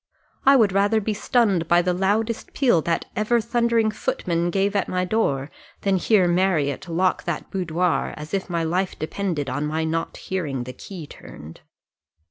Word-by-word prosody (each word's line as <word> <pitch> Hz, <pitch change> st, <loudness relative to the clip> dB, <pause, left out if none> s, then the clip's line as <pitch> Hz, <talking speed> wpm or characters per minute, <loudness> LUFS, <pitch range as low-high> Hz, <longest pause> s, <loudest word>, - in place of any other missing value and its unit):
I 275 Hz, -, +8 dB
would 220 Hz, -6 st, +4 dB
rather 200 Hz, +3 st, +3 dB
be 215 Hz, +1 st, -2 dB
stunned 205 Hz, -6 st, +1 dB
by 175 Hz, +1 st, +4 dB
the 180 Hz, 0 st, +1 dB
loudest 210 Hz, +5 st, -1 dB
peal 240 Hz, -, +3 dB
that 165 Hz, +1 st, -1 dB
ever 215 Hz, +3 st, +2 dB
thundering 235 Hz, -1 st, +1 dB
footman 175 Hz, -4 st, -1 dB
gave 195 Hz, +3 st, 0 dB
at 200 Hz, -, 0 dB
my 180 Hz, 0 st, 0 dB
door, 150 Hz, -9 st, 0 dB, 0.3 s
than 195 Hz, -1 st, +2 dB
hear 190 Hz, -1 st, +3 dB
Marriott 175 Hz, -2 st, +1 dB
lock 180 Hz, +3 st, +1 dB
that 175 Hz, -3 st, -4 dB
boudoir, 180 Hz, -1 st, 0 dB
as 150 Hz, +3 st, -9 dB
if 195 Hz, 0 st, -2 dB
my 170 Hz, -1 st, -1 dB
life 180 Hz, +3 st, -1 dB
depended 160 Hz, -3 st, -3 dB
on 145 Hz, +3 st, -2 dB
my 160 Hz, +1 st, -1 dB
not 165 Hz, +1 st, -2 dB
hearing 150 Hz, -9 st, -3 dB
the 125 Hz, +1 st, -8 dB
key 180 Hz, 0 st, -9 dB
turned." 75 Hz, -, -12 dB
185 Hz, 170 wpm, -23 LUFS, 165-205 Hz, 0.3 s, I